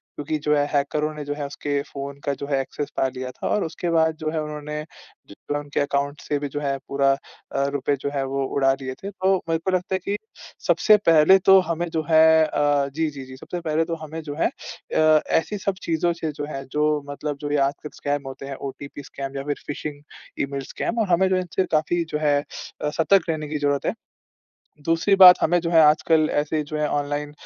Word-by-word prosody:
क्योंकि 155 Hz, +1 st, -2 dB
जो 150 Hz, 0 st, +1 dB
है 145 Hz, 0 st, +2 dB
हैकरों 150 Hz, +2 st, 0 dB
ने 150 Hz, -, -5 dB
जो 145 Hz, -, -2 dB
है 145 Hz, -1 st, -4 dB
उसके 145 Hz, 0 st, -2 dB
फ़ोन 140 Hz, 0 st, -7 dB
का 140 Hz, -, +1 dB
जो 140 Hz, -, -6 dB
है 140 Hz, -2 st, +1 dB
एक्सेस 145 Hz, +2 st, -5 dB
पा 135 Hz, -, +2 dB
लिया 130 Hz, 0 st, -5 dB
था। -, -, -5 dB
और 210 Hz, -, +1 dB
उसके 165 Hz, +2 st, -4 dB
बाद 160 Hz, -1 st, +3 dB
जो 155 Hz, -1 st, -3 dB
है 160 Hz, -1 st, -1 dB
उन्होंने 150 Hz, 0 st, -5 dB, 0.5 s
जितना 145 Hz, +8 st, -5 dB
उनके 145 Hz, 0 st, -4 dB
अकाउंट 145 Hz, 0 st, -1 dB
से 145 Hz, -, -1 dB
भी 145 Hz, -, -3 dB
जो 145 Hz, -, -4 dB
है 140 Hz, -1 st, -1 dB
पूरा 140 Hz, 0 st, +2 dB
अ, 140 Hz, 0 st, -5 dB
रुपए 145 Hz, 0 st, 0 dB
जो 140 Hz, -, -1 dB
है 135 Hz, -, 0 dB
वो 135 Hz, 0 st, -2 dB
उड़ा 135 Hz, -1 st, +4 dB
लिए 130 Hz, 0 st, -4 dB
थे। 200 Hz, -, -4 dB
तो 190 Hz, 0 st, +2 dB
मेरे 165 Hz, 0 st, +1 dB
को 190 Hz, -, +1 dB
लगता 185 Hz, +1 st, 0 dB
है -, -, -1 dB
कि 205 Hz, +1 st, -1 dB, 0.5 s
सबसे 175 Hz, +5 st, +5 dB
पहले 165 Hz, +4 st, +7 dB
तो 190 Hz, 0 st, +8 dB
हमें 170 Hz, 0 st, -2 dB
जो 160 Hz, -1 st, -2 dB
है 160 Hz, 0 st, +6 dB
अ, 145 Hz, -2 st, +1 dB
जी, 160 Hz, +2 st, -1 dB
जी, 135 Hz, -2 st, -9 dB
जी। 130 Hz, 0 st, -11 dB
सबसे 175 Hz, +5 st, -6 dB
पहले 160 Hz, 0 st, 0 dB
तो 165 Hz, -1 st, -3 dB
हमें 160 Hz, +1 st, -6 dB
जो 145 Hz, -1 st, -6 dB
है -, -, +3 dB
अ, 155 Hz, -1 st, +1 dB
ऐसी 205 Hz, +6 st, 0 dB
सब 195 Hz, 0 st, -1 dB
चीज़ों 170 Hz, +1 st, +1 dB
से 160 Hz, -2 st, -4 dB
जो 145 Hz, 0 st, -5 dB
है 135 Hz, -2 st, -5 dB
जो 150 Hz, 0 st, +2 dB, 0.2 s
मतलब 145 Hz, 0 st, -4 dB
जो 145 Hz, 0 st, -3 dB
ये 145 Hz, -, +2 dB
आजकल 145 Hz, +2 st, -4 dB
स्कैम 145 Hz, 0 st, -2 dB
होते 135 Hz, +1 st, -8 dB
हैं, 135 Hz, -, -5 dB
ओटीपी 140 Hz, +1 st, -8 dB
स्कैम 135 Hz, 0 st, -7 dB
या 135 Hz, -, -3 dB
फिर 145 Hz, 0 st, -2 dB
फिशिंग 145 Hz, 0 st, -5 dB, 0.4 s
ईमेल 140 Hz, 0 st, -4 dB
स्कैम, 230 Hz, -, -3 dB
और 215 Hz, -, +1 dB
हमें 185 Hz, +2 st, +4 dB
जो 185 Hz, -, +2 dB
इनसे 185 Hz, +1 st, -1 dB
काफ़ी 170 Hz, +2 st, 0 dB
जो -, -, 0 dB
है 145 Hz, -2 st, +3 dB
अ, 150 Hz, -, -6 dB
सतर्क 165 Hz, +4 st, +2 dB
रहने 155 Hz, -2 st, -2 dB
की 150 Hz, -, -2 dB
ज़रूरत 145 Hz, -1 st, 0 dB
है। -, -, +1 dB, 0.9 s
दूसरी 165 Hz, +5 st, +3 dB
बात 180 Hz, -1 st, +11 dB
हमें 175 Hz, +2 st, +3 dB
जो 170 Hz, 0 st, -2 dB
है 165 Hz, -1 st, +6 dB
आजकल 155 Hz, +1 st, +4 dB
ऐसे 150 Hz, +1 st, 0 dB
जो 150 Hz, +1 st, -6 dB
है 150 Hz, -, +1 dB
ऑनलाइन 145 Hz, 0 st, -2 dB
150 Hz, 230 wpm, -23 LUFS, 140-165 Hz, 0.9 s, बात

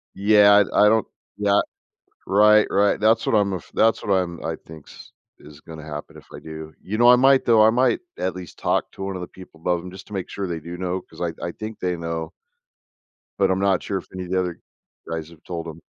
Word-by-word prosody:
Yeah, 105 Hz, 0 st, +6 dB
I -, -, +5 dB
I 105 Hz, -, +6 dB
don't, 110 Hz, -1 st, +2 dB, 0.3 s
yeah 100 Hz, 0 st, +3 dB, 0.7 s
right, 105 Hz, +2 st, +5 dB
right. 100 Hz, +1 st, +2 dB
That's 110 Hz, +2 st, +3 dB
what -, -, 0 dB
I'm 100 Hz, -2 st, +2 dB
af 90 Hz, -, -7 dB
that's 115 Hz, 0 st, +2 dB
what 100 Hz, -, -2 dB
I'm 90 Hz, -3 st, -1 dB
I 80 Hz, -, -2 dB
thinks 80 Hz, -2 st, -13 dB, 0.3 s
is 75 Hz, 0 st, -15 dB
gonna 80 Hz, -1 st, -11 dB
happen 75 Hz, -1 st, -8 dB
if -, -, -15 dB
I -, -, -8 dB
do. 80 Hz, 0 st, -9 dB
You 105 Hz, +3 st, -4 dB
know, 120 Hz, +1 st, +6 dB
I 125 Hz, -, +9 dB
might 135 Hz, +2 st, +4 dB
though, 110 Hz, -2 st, +5 dB
I -, -, +6 dB
might 125 Hz, +1 st, +2 dB, 0.2 s
at 90 Hz, 0 st, -2 dB
least 90 Hz, -2 st, -10 dB
talk -, -, 0 dB
to -, -, -7 dB
1 95 Hz, 0 st, -4 dB
of 90 Hz, -, -5 dB
the 90 Hz, -, -6 dB
people 90 Hz, -3 st, -15 dB
above 90 Hz, 0 st, -1 dB
them, 90 Hz, +1 st, -9 dB
just 95 Hz, +1 st, -12 dB
to 105 Hz, -, -12 dB
make 95 Hz, -2 st, -4 dB
sure 100 Hz, -1 st, -4 dB
they 85 Hz, -2 st, -4 dB
do 85 Hz, +3 st, -8 dB
know, 90 Hz, 0 st, -3 dB
'cause 80 Hz, -1 st, -15 dB
I 85 Hz, -1 st, -1 dB
I 85 Hz, -, -3 dB
think 110 Hz, +4 st, -8 dB
they 90 Hz, -1 st, -1 dB
know 85 Hz, -1 st, -4 dB, 1.1 s
but 95 Hz, -1 st, +3 dB
I'm 95 Hz, -, +1 dB
not 95 Hz, -2 st, +2 dB
sure 100 Hz, -, -3 dB
if 95 Hz, -, -7 dB
any 95 Hz, -1 st, -5 dB
of -, -, -11 dB
the 95 Hz, -, +2 dB
other 90 Hz, -2 st, -3 dB, 0.5 s
guys 80 Hz, -1 st, -4 dB
have 85 Hz, -2 st, -17 dB
told 85 Hz, -2 st, -5 dB
'em. 80 Hz, 0 st, -9 dB
95 Hz, 245 wpm, -22 LUFS, 85-105 Hz, 1.1 s, I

